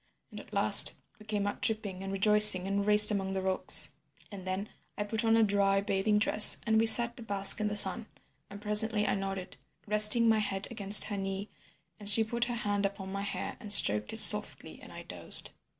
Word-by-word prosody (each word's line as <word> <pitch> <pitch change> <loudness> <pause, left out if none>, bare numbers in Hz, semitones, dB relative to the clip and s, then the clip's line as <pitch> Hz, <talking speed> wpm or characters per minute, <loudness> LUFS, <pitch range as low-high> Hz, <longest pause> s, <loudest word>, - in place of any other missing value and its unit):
And - - -12
at - - -18
last - - +5 0.2
we 215 - -20
came 205 -2 -5
out 205 - -8
dripping 210 -4 -5
and 195 0 -9
rejoicing 210 -1 +5
and 200 +1 -5
raced 210 0 +6
among 195 -2 -6
the 190 - -6
rocks. 190 0 -1 0.4
And 190 -2 -13
then 190 +3 -7 0.3
I 205 - -5
put 220 +2 -7
on 225 0 -1
a 225 - +1
dry 200 -1 -2
bathing 200 +1 -4
dress, 210 0 +3
and 220 -1 -1
we 225 - 0
sat 235 +1 +5
to - - -10
bask 200 -2 0
in 210 - -4
the 210 - -7
sun, 205 +3 +2 0.4
and 200 - -13
presently 210 0 -2
I - - -3
nodded, 195 -1 -9 0.3
resting 210 +2 +3
my 220 -1 0
head 200 -2 -5
against 205 -2 +2
her 210 -1 -7
knee, 195 +1 -8 0.5
and 205 -1 -7
she 220 +2 +3
put 235 +2 -5
her 240 -1 -7
hand 205 -3 -5
upon 195 -1 -7
my 200 0 -7
hair 200 - -9
and 210 - -10
stroked 105 - +2
it - - -10
softly - - +3
and - - -16
I - - -13
dozed. - - -9
205 Hz, 215 wpm, -26 LUFS, 195-215 Hz, 0.5 s, raced